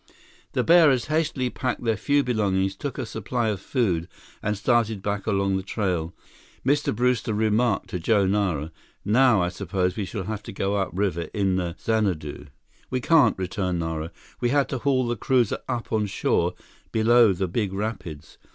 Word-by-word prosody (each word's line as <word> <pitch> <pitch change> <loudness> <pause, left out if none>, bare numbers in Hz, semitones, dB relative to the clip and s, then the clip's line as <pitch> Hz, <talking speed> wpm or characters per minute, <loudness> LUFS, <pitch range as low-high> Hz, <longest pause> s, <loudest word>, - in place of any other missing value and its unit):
The - - +1
bearers 160 -8 +5
hastily 145 -6 0
packed 125 -3 -3
their 115 -2 +1
few 140 +7 +2
belongings, 100 -5 0
took 140 +7 -5
a 130 - -3
supply 110 +2 -2
of 100 -3 -3
food, 95 - 0 0.3
and 105 0 -1
started 110 -2 +1
back 100 0 -2
along 100 -2 +1
the - - -2
trail. 90 -5 -2 0.5
Mr. 145 +2 +2
Brewster 120 -2 +1
remarked 110 +1 +1
to 90 - -2
Joe 100 +3 +2
Nara, 95 -6 0 0.3
"Now 110 -2 +4
I 90 - 0
suppose 90 -1 -2
we 105 - -2
shall 95 +1 -5
have 105 +2 -4
to - - -9
go 95 +1 -1
upriver 95 -3 -1
in 95 -3 +1
the 85 -2 -2
Xanadu." 95 -11 -1 0.4
"We 130 - -1
can't," 160 +3 +4
returned 95 -1 -2
Nara. 80 -1 -3 0.3
"We 120 - +1
had 140 +1 +2
to 130 - -2
haul 130 -1 +1
the 120 - 0
cruiser 125 -1 +1
up 120 -2 -3
on 105 -1 +1
shore - - 0 0.4
below 115 0 +5
the 95 0 -1
big 100 +2 -1
rapids. 95 -7 -5
105 Hz, 170 wpm, -25 LUFS, 95-120 Hz, 0.5 s, bearers